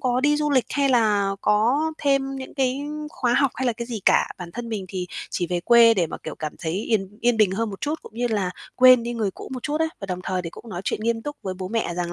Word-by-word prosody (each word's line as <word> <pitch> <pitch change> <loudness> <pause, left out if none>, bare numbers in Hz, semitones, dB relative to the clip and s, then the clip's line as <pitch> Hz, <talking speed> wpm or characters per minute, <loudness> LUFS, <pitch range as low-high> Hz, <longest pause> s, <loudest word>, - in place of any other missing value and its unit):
có 250 -1 +1
đi 295 +2 +3
du 300 0 0
lịch 260 -4 +3
hay 280 -1 +1
là 210 -5 +3
có 225 +7 +3 0.2
thêm 275 -1 +1
những 260 -1 -8
cái 265 0 0 0.3
khóa 245 -2 0
học 275 - +3
hay 260 +2 -2
là 240 - +2
cái 235 +1 -6
gì 230 -3 -5
cả. - - +4
Bản 175 -1 -7
thân 240 -1 -6
mình 210 -4 -3
thì 180 -1 -4 0.2
chỉ 175 - -1
về 175 0 -1
quê 235 +2 +6
để 175 -4 +1
mà, - - -6
kiểu, 155 - -6
cảm 155 -1 -5
thấy 160 - -3
yên 205 +1 -1
yên 240 -1 +3
bình 215 -4 +4
hơn 220 +3 -1
một 195 - -8
chút, 300 +2 -3
cũng - - -13
như 245 +1 0
là 205 -5 0 0.3
quên 255 -1 +7
đi 240 +1 -3
người 215 -4 -1
cũ - - -10
một 250 -2 -5
chút 300 +2 -2
á, 320 - +3
và 195 - -5
đồng 180 -1 -4
thời 185 -1 -2
thì 165 - -5
cũng 230 - -12
nói 175 -3 -5
chuyện - - -1
nghiêm 225 +1 -1
túc 295 +3 -5
với 185 -1 -3
bố 185 0 -6
mẹ 225 -6 -1
rằng 175 -1 -3
230 Hz, 285 wpm, -24 LUFS, 190-255 Hz, 0.3 s, quên